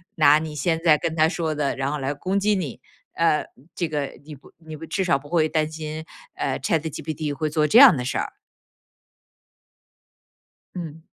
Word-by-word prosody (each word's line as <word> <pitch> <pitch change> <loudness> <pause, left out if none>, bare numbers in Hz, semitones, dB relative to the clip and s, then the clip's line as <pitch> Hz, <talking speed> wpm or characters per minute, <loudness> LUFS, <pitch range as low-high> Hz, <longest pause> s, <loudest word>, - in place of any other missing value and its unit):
拿 150 -1 +6
你 155 -1 -6
现 160 +3 0
在 155 -3 +5
跟 160 - -3
他 160 0 +4
说 165 -3 -2
的， 145 -2 -1
然 135 +1 -2
后 150 - -3
来 135 +2 -2
攻 185 +7 -1
击 210 +1 +2
你， 160 -10 -4 0.3
呃， 165 -2 +2 0.3
这 170 - -1
个 145 -3 -3
你 155 - -9
不 140 - -16
你 160 -1 -10
不 160 +2 -9
至 190 +4 -1
少 175 -6 +2
不 145 +1 -15
会 160 -2 +2
担 155 -1 -1
心， 155 0 -6 0.3
呃 - - -2
，ChatGPT 155 -3 -2
会 155 +3 -2
做 150 0 +1
这 215 - +4
样 265 - +10
的 125 - -3
事 125 - -2
儿。 - - -3 2.4
嗯。 160 -2 -8
155 Hz, 230 characters per minute, -23 LUFS, 150-165 Hz, 2.4 s, 样